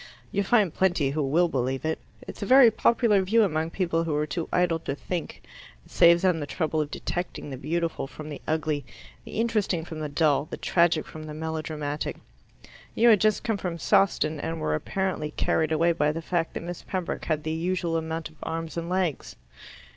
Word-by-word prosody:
You'll 200 0 0
find 205 -7 +3
plenty 175 -7 +1
who 150 +2 -1
will 155 +6 +3
believe 130 -1 -2
it. 160 0 -1 0.2
It's - - -10
a - - -1
very 260 -3 +8
popular 225 -2 +3
view 220 +5 +3
among 160 -4 0
people 170 -2 0
who 160 -3 -1
are 150 +1 +1
too 165 +2 -4
idle 175 -2 +2
to 140 -4 -4
think; 170 +2 -5 0.4
it - - -20
saves 170 +1 +5
them 180 -3 +3
the 145 - -4
trouble 155 0 -1
of 150 - -3
detecting 175 -4 -4
the - - -4
beautiful 165 +2 -2
from 155 +2 -9
the 145 - -7
ugly, 155 -2 0 0.4
the - - -10
interesting 210 -8 0
from 160 -2 -7
the 150 -1 -3
dull, 145 -1 +2
the - - -5
tragic 170 -2 +2
from 155 0 -9
the 150 - -7
melodramatic. 155 -2 -3 0.8
You 235 +2 +5
had 215 -4 +6
just 215 -1 +2
come 225 -3 0
from 180 -3 -4
Sawston, 170 -5 +2
and 160 +2 -3
were 75 - -1
apparently 185 - -2
carried 160 -1 +1
away 165 +2 +3
by 150 -3 +1
the 165 +1 -5
fact 165 -1 -1
that - - -4
Miss 175 0 -6
Pembroke 185 -2 -4
had 155 -2 -1
the 155 - -2
usual 170 +1 -1
amount 160 0 -2
of 160 - -21
arms 165 0 -4
and 170 0 -3
legs." 180 -5 -1
165 Hz, 200 wpm, -26 LUFS, 155-180 Hz, 0.8 s, very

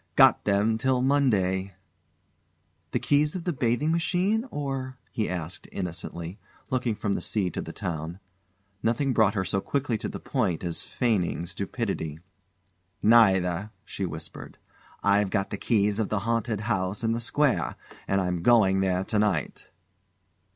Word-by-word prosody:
"Got - - +6
them 105 +2 +2
till 130 0 +2
Monday!" 100 -9 +2 1.1
"The - - 0
keys 150 +2 +2
of 180 - -4
the 175 - -1
bathing 125 +4 +1
machine, 185 +7 +1
or 135 - -4
?" - - -38
he 110 - -1
asked 90 -1 -5
innocently, 85 0 -5 0.3
looking 125 -3 0
from 100 -1 -1
the - - -2
sea 95 -5 0
to - - -3
the - - -7
town. 80 +2 -4 0.6
Nothing 125 +4 +1
brought 110 -2 +3
her 95 -2 0
so 95 - 0
quickly 130 -4 -1
to - - -3
the - - -6
point 100 - -1
as 85 -2 -3
feigning 100 -8 0
stupidity. 95 - -3 0.9
"Neither," 100 -4 +4 0.2
she 95 - -3
whispered. 80 0 -8 0.5
"I've 100 0 +3
got 95 -1 -1
the 100 - -2
keys 105 -2 +2
of 110 - 0
the 105 -2 0
haunted 115 -2 0
house 100 -2 -1
in 115 - +2
the 115 - 0
square 140 +4 +1 0.3
and 95 - +2
I'm 90 -2 -1
going 95 -4 +5
there 95 -1 +1
to 105 +2 0
night." 100 -8 -1
105 Hz, 155 wpm, -27 LUFS, 95-125 Hz, 1.1 s, Got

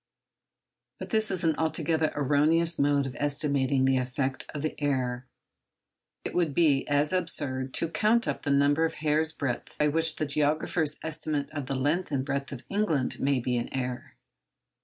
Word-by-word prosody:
But - - -8
this 220 -2 +1
is 185 -2 -1
an 160 -2 +2
altogether 160 0 0
erroneous 155 +4 +2
mode 140 0 +2
of 130 - -6
estimating 140 -2 +1
the 135 0 +3
effect 130 +1 -2
of 145 -1 -5
the 155 - -1
error. 130 -3 -1 1.0
It - - -4
would 165 -6 0
be 150 -5 +3
as 145 +3 +1
absurd 140 -7 0
to 165 - +1
count 220 +7 +2
up - - -2
the 145 - -3
number 140 +2 +3
of 165 - 0
hairs' 155 +1 +1
breadth 135 -6 -4
by 150 0 +2
which 160 +1 +1
the 155 - -2
geographer's 150 +1 0
estimates 155 -2 -2
of 145 -3 -4
the 135 - -2
length 150 +8 0
and 135 -3 -1
breadth 140 0 -3
of 125 -3 -8
England 180 -11 0
may 135 -1 +1
be 125 0 -1
in 120 - -3
error. 125 -2 -4
145 Hz, 175 wpm, -28 LUFS, 135-160 Hz, 1.0 s, the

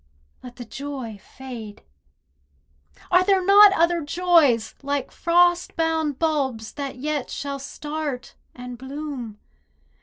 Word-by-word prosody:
Let 250 -1 -11
the 245 - -9
joy 260 -4 -7
fade. 235 -4 -10 1.3
Are 360 +1 +5
there 380 -1 +2
not 405 +1 +8
other 340 -1 +2
joys, 310 -7 +3
Like 280 -1 -2
frost 350 +1 +2
bound 320 -4 0
bulbs, 270 -9 -1
that 280 -2 -5
yet 290 +1 -3
shall 280 0 -4
start 295 -1 -5 0.2
and 250 -1 -8
bloom? 265 -5 -6
285 Hz, 115 wpm, -23 LUFS, 250-330 Hz, 1.3 s, not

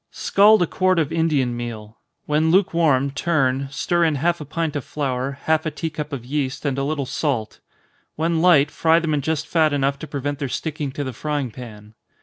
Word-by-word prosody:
_ - - -55
Scald 210 0 +4
a - - +2
quart 185 +1 +1
of 155 -4 0
Indian 150 -7 +1
meal 115 -2 -7 0.3
when 155 +2 +1
lukewarm, 160 -7 +3
turn, 135 -3 0
stir 170 +5 0
in 160 -2 +2
half 170 +4 0
a - - -6
pint 160 +1 -3
of 145 - -2
flour, 135 -1 -3
half 160 0 +2
a - - +1
tea 160 +2 -4
cup 150 -1 -5
of 130 -4 -6
yeast, 135 +1 -3
and 140 -1 -1
a - - 0
little 145 -1 -2
salt. 125 -5 -2 0.6
When 165 +1 0
light, 155 -5 +5
fry 165 0 +3
them 165 -2 0
in 145 - +1
just 160 +2 -1
fat 155 -3 +2
enough 140 0 0
to 155 - -7
prevent 145 0 -4
their 140 -3 -3
sticking 150 0 -3
to 145 - -3
the 130 -2 -5
frying 145 -1 -3
pan. 110 -3 -11
145 Hz, 210 wpm, -22 LUFS, 135-160 Hz, 0.6 s, light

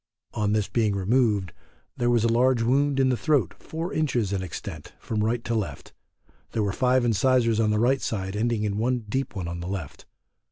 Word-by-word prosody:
On 105 -1 0
this 105 -2 +1
being 110 -4 +1
removed, 100 -2 +1 0.4
there 120 0 0
was 120 -2 +3
a - - +3
large 125 0 +3
wound 135 +3 +2
in 130 -1 +4
the 125 - +2
throat 135 - +1
four 165 +3 -5
inches 125 -10 0
in 95 - -1
extent 90 -4 -7
from 105 -2 -2
right 115 +2 0
to 120 - -2
left; 110 -4 -4 0.6
there 110 - 0
were 100 -1 -1
five 125 +1 +2
incisors 115 0 +2
on 110 -1 +2
the 105 - +2
right 130 +4 +2
side 95 -2 -3
ending 115 0 0
in 105 0 -1
one 120 0 0
deep 130 +2 -2
one 90 -3 -4
on 85 0 -5
the 85 - -5
left. 90 -7 -6
115 Hz, 205 wpm, -25 LUFS, 105-125 Hz, 0.6 s, in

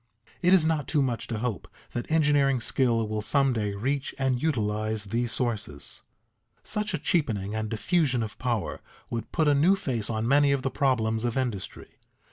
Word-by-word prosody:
It 180 0 +4
is 185 -4 +6
not 160 -3 0
too 150 -4 +2
much 120 -4 -2
to 115 - -3
hope 115 -2 -3 0.2
that 120 +5 -5
engineering 145 -4 +3
skill 115 -2 +1
will 110 0 -2
some 135 +4 +2
day 105 -3 -2
reach 135 +6 -2
and 130 -2 0
utilize 110 -7 -1
these 115 +3 -1
sources. 105 - -3 0.6
Such 210 -2 -1
a - - 0
cheapening 110 - 0
and 110 0 -2
diffusion 130 - +1
of 110 - -7
power 120 -5 -2 0.3
would 115 -2 -4
put 160 -3 +1
a 145 - +5
new 160 +8 +4
face 120 - -3
on 110 0 -1
many 140 +2 +4
of 140 -2 0
the 135 - -1
problems 115 -5 +1
of 120 +1 -1
industry. 120 -8 -4
125 Hz, 180 wpm, -27 LUFS, 110-145 Hz, 0.6 s, is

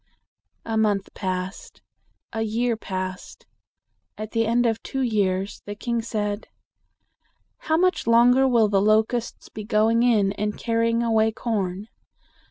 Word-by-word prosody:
A 225 -1 -2
month 205 -3 0
passed; 185 0 -5 0.5
a 225 - -2
year 230 +2 0
passed. 185 -3 -6 0.7
At 215 0 -6
the 225 -1 +1
end 240 +2 +2
of 225 -1 0
two 270 - -4
years, 200 -4 0
the 205 - -5
king 235 +2 -2
said, 210 -2 -3 1.1
"How 315 0 0
much 365 -7 +1
longer 245 +3 +5
will 235 -4 +4
the 200 -1 +2
locusts 220 +3 +1
be 215 - -7
going 220 +2 +2
in 215 -5 +3
and 210 0 -3
carrying 230 0 0
away 220 -1 +2
corn?" 205 -4 -3
220 Hz, 135 wpm, -24 LUFS, 205-235 Hz, 1.1 s, longer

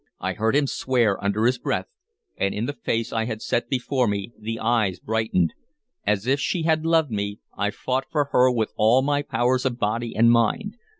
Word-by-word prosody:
I - - -2
heard 110 +4 0
him 145 0 +3
swear 120 -7 0
under 100 +2 +1
his 125 +1 +2
breath, - - -1 0.5
and 100 0 -1
in 105 +3 -1
the 145 - -3
face 115 -4 -2
I 110 0 0
had 110 -2 -4
set 120 - -1
before 130 -1 0
me 100 +2 -3
the 115 +1 -4
eyes 110 -5 +1
brightened. 110 -6 0 0.5
As 105 0 +1
if 135 +3 +2
she 170 +2 -1
had 160 0 +1
loved 160 -5 +3
me 100 -1 -2 0.2
I 105 0 0
fought 130 +5 -2
for 145 -3 0
her 125 +1 +5
with 115 -3 -1
all 115 +5 +4
my 145 0 +1
powers 125 -2 0
of 125 -3 -1
body 115 +1 -2
and 115 +2 +5
mind. 120 - +1
115 Hz, 200 wpm, -24 LUFS, 110-130 Hz, 0.5 s, her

